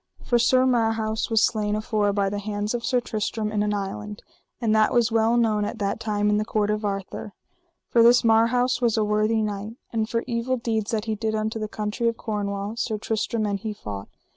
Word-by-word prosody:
For 240 Hz, -, +2 dB
Sir 255 Hz, +2 st, +4 dB
Marhaus 225 Hz, -3 st, +1 dB
was 225 Hz, -2 st, +4 dB
slain 210 Hz, -2 st, -1 dB
afore 215 Hz, -1 st, 0 dB
by 200 Hz, -1 st, +1 dB
the 205 Hz, +1 st, -2 dB
hands 205 Hz, +1 st, -3 dB
of 240 Hz, -1 st, -3 dB
Sir 250 Hz, 0 st, +2 dB
Tristram 215 Hz, -1 st, -2 dB
in 210 Hz, -1 st, 0 dB
an 210 Hz, 0 st, 0 dB
island; 205 Hz, +1 st, -4 dB, 0.4 s
and 225 Hz, -3 st, +1 dB
that 215 Hz, +2 st, +3 dB
was 235 Hz, -2 st, +3 dB
well 225 Hz, +1 st, +3 dB
known 215 Hz, -3 st, +2 dB
at 205 Hz, -, -3 dB
that 200 Hz, -1 st, -2 dB
time 210 Hz, -1 st, 0 dB
in 210 Hz, -, +3 dB
the 210 Hz, -, +1 dB
court 210 Hz, -1 st, 0 dB
of 210 Hz, 0 st, -2 dB
Arthur, 200 Hz, 0 st, -4 dB, 0.5 s
for 235 Hz, -, +3 dB
this 240 Hz, +1 st, +6 dB
Marhaus 230 Hz, +3 st, +3 dB
was 235 Hz, -2 st, +2 dB
a 215 Hz, -, +3 dB
worthy 215 Hz, +1 st, +1 dB
knight. 210 Hz, +1 st, -4 dB, 0.2 s
And 220 Hz, -1 st, 0 dB
for 230 Hz, -1 st, -1 dB
evil 245 Hz, +1 st, -1 dB
deeds 220 Hz, -3 st, -2 dB
that 220 Hz, -1 st, -1 dB
he 220 Hz, -, -1 dB
did 220 Hz, 0 st, -2 dB
unto 220 Hz, +1 st, -2 dB
the 215 Hz, -, -3 dB
country 210 Hz, +2 st, -2 dB
of 230 Hz, 0 st, 0 dB
Cornwall 205 Hz, 0 st, -3 dB
Sir 220 Hz, -2 st, -1 dB
Tristram 220 Hz, +1 st, -1 dB
and 200 Hz, -1 st, -1 dB
he 215 Hz, +1 st, -4 dB
fought. 100 Hz, -, -7 dB
215 Hz, 215 wpm, -24 LUFS, 210-230 Hz, 0.5 s, this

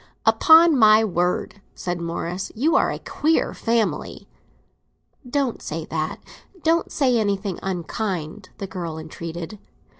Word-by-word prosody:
"Upon 325 Hz, -1 st, +6 dB
my 220 Hz, -2 st, +6 dB
word," 180 Hz, +1 st, -1 dB
said 175 Hz, -1 st, -4 dB
Morris, 170 Hz, +2 st, -4 dB
"you 310 Hz, +9 st, +2 dB
are -, -, +3 dB
a -, -, -4 dB
queer 320 Hz, +2 st, 0 dB
family!" 230 Hz, -1 st, -1 dB, 1.0 s
"Don't 270 Hz, -2 st, -1 dB
say 155 Hz, +1 st, -5 dB
that—don't 325 Hz, -, -3 dB
say 255 Hz, -5 st, +2 dB
anything 200 Hz, -3 st, -1 dB
unkind," 185 Hz, 0 st, -4 dB
the 195 Hz, -, -5 dB
girl 175 Hz, -4 st, -5 dB
entreated. 165 Hz, +4 st, -7 dB
200 Hz, 115 wpm, -23 LUFS, 170-245 Hz, 1.0 s, Upon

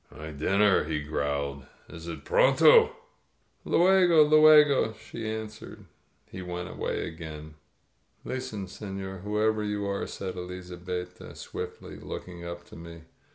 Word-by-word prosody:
"My 75 Hz, +1 st, -9 dB
dinner," 95 Hz, +6 st, +2 dB
he 75 Hz, -1 st, -2 dB
growled. 70 Hz, -2 st, -3 dB, 0.2 s
"Is 85 Hz, 0 st, -10 dB
it 80 Hz, -4 st, -7 dB
pronto? -, -, +5 dB, 0.7 s
Lv£gOy 185 Hz, +1 st, +4 dB, 0.2 s
ItLegoT* 150 Hz, -7 st, +6 dB
she 110 Hz, 0 st, -7 dB
answered. 110 Hz, -1 st, -7 dB, 0.4 s
He 95 Hz, -, -9 dB
went 90 Hz, 0 st, -5 dB
away -, -, -3 dB
again. 80 Hz, -2 st, -9 dB, 0.7 s
"Listen, 110 Hz, -6 st, -4 dB
seiior, 95 Hz, -1 st, -7 dB
whoever 105 Hz, +1 st, 0 dB
you 105 Hz, -1 st, -2 dB
are!" 100 Hz, 0 st, -2 dB
said 95 Hz, -1 st, -6 dB
Elizabetta 90 Hz, 0 st, -7 dB
swiftly, -, -, -8 dB
looking 90 Hz, -1 st, -8 dB
up 85 Hz, 0 st, -7 dB
to -, -, -12 dB
me. 85 Hz, 0 st, -11 dB
90 Hz, 120 wpm, -27 LUFS, 85-105 Hz, 0.7 s, ItLegoT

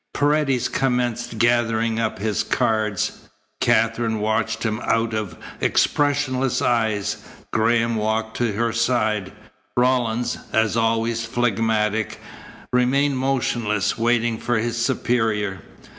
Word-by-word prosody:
Paredes 145 Hz, -3 st, +2 dB
commenced 125 Hz, -3 st, -1 dB
gathering 115 Hz, -1 st, +2 dB
up 110 Hz, -1 st, -1 dB
his 105 Hz, +1 st, -1 dB
cards. 110 Hz, -5 st, -1 dB, 0.3 s
Katherine 115 Hz, -1 st, +2 dB
watched 110 Hz, +2 st, -1 dB
him 110 Hz, -1 st, -1 dB
out 115 Hz, 0 st, +1 dB
of 105 Hz, -4 st, -3 dB, 0.2 s
expressionless 135 Hz, -3 st, +1 dB
eyes. 110 Hz, -4 st, 0 dB, 0.4 s
Graham 115 Hz, +1 st, +2 dB
walked 110 Hz, +1 st, -1 dB
to 120 Hz, -3 st, 0 dB
her 115 Hz, +2 st, 0 dB
side. 110 Hz, -5 st, 0 dB, 0.5 s
Rawlins, 125 Hz, -2 st, +1 dB
as 110 Hz, 0 st, +2 dB
always 115 Hz, 0 st, +1 dB
phlegmatic, 110 Hz, -2 st, 0 dB, 0.5 s
remained 130 Hz, +2 st, +2 dB
motionless, 120 Hz, -6 st, 0 dB
waiting 115 Hz, 0 st, +1 dB
for 120 Hz, -1 st, 0 dB
his 115 Hz, +1 st, -1 dB
superior. 115 Hz, -7 st, 0 dB
115 Hz, 105 wpm, -22 LUFS, 110-120 Hz, 0.5 s, Paredes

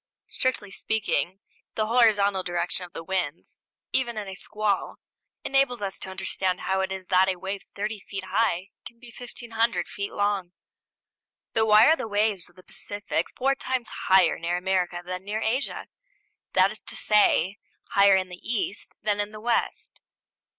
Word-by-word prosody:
Strictly 250 Hz, -6 st, -2 dB
speaking, 200 Hz, -3 st, -1 dB, 0.3 s
the 215 Hz, -, +1 dB
horizontal 210 Hz, -4 st, +4 dB
direction 175 Hz, 0 st, -2 dB
of 175 Hz, -, -29 dB
the 165 Hz, -, -6 dB
winds, 175 Hz, -3 st, -3 dB, 0.3 s
even 240 Hz, -3 st, 0 dB
in 210 Hz, -2 st, -4 dB
a 190 Hz, -, -6 dB
squall, 210 Hz, +1 st, -1 dB, 0.5 s
enables 270 Hz, -3 st, +2 dB
us 195 Hz, -2 st, -4 dB
to -, -, -6 dB
understand 190 Hz, -1 st, -2 dB
how 190 Hz, 0 st, 0 dB
it 190 Hz, -, -2 dB
is 190 Hz, -1 st, -5 dB
that 190 Hz, 0 st, +5 dB
a 190 Hz, -, 0 dB
wave 195 Hz, +3 st, -5 dB
30 210 Hz, +1 st, -3 dB
feet 195 Hz, 0 st, -7 dB
high 190 Hz, -1 st, 0 dB
can 235 Hz, -, -11 dB
be 240 Hz, -1 st, -13 dB
1,500 235 Hz, -1 st, -1 dB
feet 200 Hz, 0 st, -5 dB
long. 200 Hz, -3 st, -1 dB, 1.0 s
But 220 Hz, 0 st, +2 dB
why 215 Hz, 0 st, +8 dB
are 320 Hz, -, +6 dB
the 275 Hz, -, -5 dB
waves 205 Hz, -4 st, 0 dB
of 175 Hz, -, -25 dB
the 185 Hz, -, -15 dB
Pacific 205 Hz, -5 st, -3 dB
four 270 Hz, +2 st, +3 dB
times 260 Hz, -4 st, -3 dB, 0.2 s
higher 190 Hz, -3 st, +5 dB
near 170 Hz, +1 st, -1 dB
America 180 Hz, -1 st, 0 dB
than 185 Hz, +1 st, -5 dB
near 210 Hz, +2 st, -3 dB
Asia; 250 Hz, +6 st, -1 dB, 0.7 s
that -, -, +5 dB
is -, -, -9 dB
to -, -, -7 dB
say, 200 Hz, -3 st, +3 dB, 0.3 s
higher 200 Hz, -1 st, +6 dB
in 185 Hz, -1 st, 0 dB
the 180 Hz, -, -8 dB
East 215 Hz, -4 st, -3 dB
than 205 Hz, -1 st, +1 dB
in 205 Hz, 0 st, -1 dB
the 215 Hz, -, -9 dB
West? 235 Hz, +2 st, -1 dB
200 Hz, 170 wpm, -26 LUFS, 185-220 Hz, 1.0 s, why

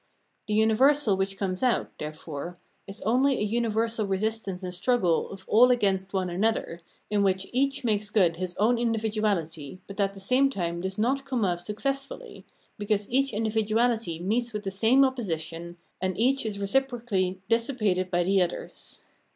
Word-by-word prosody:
The 210 Hz, -, 0 dB
universal 225 Hz, +2 st, +4 dB
which 195 Hz, +1 st, -2 dB
comes 185 Hz, -2 st, -2 dB
out, 250 Hz, -3 st, +1 dB
therefore, 155 Hz, +2 st, -6 dB, 0.3 s
is 195 Hz, +2 st, -9 dB
only 260 Hz, +5 st, +2 dB
a -, -, -1 dB
universal 225 Hz, 0 st, 0 dB
resistance 195 Hz, -1 st, -1 dB
and 180 Hz, -1 st, -4 dB
struggle 180 Hz, -3 st, +1 dB
of 195 Hz, -1 st, -10 dB
all 245 Hz, +4 st, +6 dB
against 195 Hz, -5 st, +1 dB
one 190 Hz, -2 st, -1 dB
another, 180 Hz, -1 st, -1 dB, 0.3 s
in 205 Hz, -1 st, +2 dB
which 190 Hz, -1 st, +1 dB
each 275 Hz, +2 st, 0 dB
makes 210 Hz, -3 st, 0 dB
good 180 Hz, -6 st, +2 dB
his 180 Hz, 0 st, -3 dB
own 230 Hz, +4 st, +3 dB
individuahty, 210 Hz, -9 st, -1 dB
but 195 Hz, +1 st, -10 dB
at 200 Hz, 0 st, +1 dB
the -, -, -9 dB
same 255 Hz, +8 st, +3 dB
time 170 Hz, -7 st, -3 dB
does 190 Hz, +1 st, -4 dB
not 260 Hz, +6 st, +1 dB
come 255 Hz, -6 st, -1 dB
off 175 Hz, -2 st, 0 dB
successfully, 275 Hz, -, -4 dB, 0.3 s
because 205 Hz, 0 st, 0 dB
each 275 Hz, +2 st, +2 dB
individuahty 220 Hz, -3 st, 0 dB
meets 230 Hz, +6 st, -1 dB
with 210 Hz, 0 st, -4 dB
the 195 Hz, -, -3 dB
same 230 Hz, +8 st, +4 dB
opposition, 170 Hz, -8 st, -4 dB, 0.2 s
and 185 Hz, -1 st, -1 dB
each 255 Hz, +2 st, +1 dB
is 205 Hz, -2 st, -4 dB
reciprocally 200 Hz, -4 st, 0 dB
dissi 230 Hz, +3 st, +1 dB
pated 185 Hz, -5 st, +1 dB
by 175 Hz, -1 st, +1 dB
the 190 Hz, +1 st, +3 dB
others. 175 Hz, -1 st, -5 dB
210 Hz, 165 wpm, -27 LUFS, 185-235 Hz, 0.3 s, all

